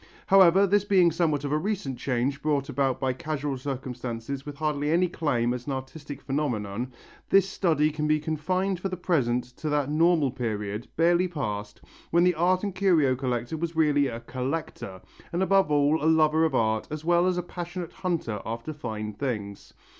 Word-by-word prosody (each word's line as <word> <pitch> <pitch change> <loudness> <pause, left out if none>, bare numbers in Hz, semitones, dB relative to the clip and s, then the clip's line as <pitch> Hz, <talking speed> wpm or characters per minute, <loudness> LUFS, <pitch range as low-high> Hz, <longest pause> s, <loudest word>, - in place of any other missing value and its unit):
However, 190 0 +6
this 200 +1 +3
being 185 -4 +4
somewhat 155 -3 0
of 145 - -3
a 150 - +2
recent 175 - -3
change 135 +2 -1
brought 145 -2 0
about 135 -2 0
by 130 -1 0
casual 150 -1 -3
circumstances 130 0 -5
with 145 - -6
hardly 150 -1 -1
any 175 +3 +3
claim 125 -8 0
as 125 +1 -6
an 140 - -1
artistic 140 +1 -7
phenomenon, 125 -5 -2 0.4
this 195 0 +5
study 160 -5 +1
can 150 0 -2
be 155 0 +3
confined 180 +5 -1
for 195 - -3
the 185 - -4
present 130 -9 +1
to 155 - -3
that 145 -1 0
normal 160 -3 +3
period, 110 -3 -4
barely 175 +2 +3
past, 105 - -5 0.3
when 170 +1 +4
the 180 0 +4
art 180 +3 +2
and 200 -2 -2
curio 170 -9 +3
collector 125 +2 -2
was 165 +1 -3
really 145 -3 +3
a 115 -2 -5
"collector" 130 -7 -4 0.3
and 175 +2 0
above 195 -3 +3
all 145 +1 +2
a 160 - +4
lover 160 0 +4
of 160 - 0
art 110 -1 +1
as 155 +1 -6
well 175 +1 +3
as 180 -1 +1
a 180 - -1
passionate 175 0 -6
hunter 160 - -2
after 115 +7 -5
fine 110 -7 -5
things. 105 -5 -5
150 Hz, 185 wpm, -26 LUFS, 130-170 Hz, 0.4 s, However